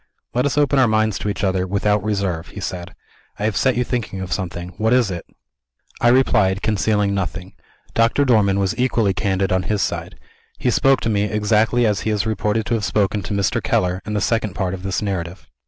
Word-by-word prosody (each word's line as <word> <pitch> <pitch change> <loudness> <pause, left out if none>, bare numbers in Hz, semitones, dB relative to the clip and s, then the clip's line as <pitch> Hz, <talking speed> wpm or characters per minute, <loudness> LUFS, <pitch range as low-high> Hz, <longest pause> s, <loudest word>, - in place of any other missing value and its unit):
"Let 125 +3 +2
us 145 - -3
open 145 -1 +3
our 130 - +5
minds 110 -1 +1
to 105 - -2
each 100 - -3
other, 95 -1 0
without 100 +1 +1
reserve," 100 -6 -2
he - - -10
said. 90 -2 -6 0.4
"I 100 - -5
have 110 -2 0
set 130 +4 +2
you 125 - +1
thinking 115 -6 -3
of 95 -2 -3
something. 90 -2 -4
What 110 +3 +2
is 125 -6 +3
it?" 85 -1 -6 0.7
I - - +4
replied, 115 -6 +3
concealing 105 -1 +1
nothing. 95 -1 -4 0.4
Doctor 115 +5 +2
Dormann 105 -6 +3
was 100 +2 0
equally 115 -6 +2
candid 95 0 0
on 95 0 +2
his 100 +2 -1
side. - - -4 0.4
He 125 - 0
spoke 135 +3 +3
to - - -1
me, 100 -1 +1
exactly 110 +3 +2
as 105 -3 +1
he - - -2
is 105 -1 0
reported 110 0 -1
to 120 - -1
have 110 -2 0
spoken 105 0 0
to 100 - -4
Mr. 100 -1 0
Keller, 90 +1 0
in 105 - -4
the 105 - 0
Second 110 -4 0
Part 95 -2 -1
of 95 - -6
this 95 +2 -2
narrative. 95 -2 -4
105 Hz, 215 wpm, -20 LUFS, 95-115 Hz, 0.7 s, our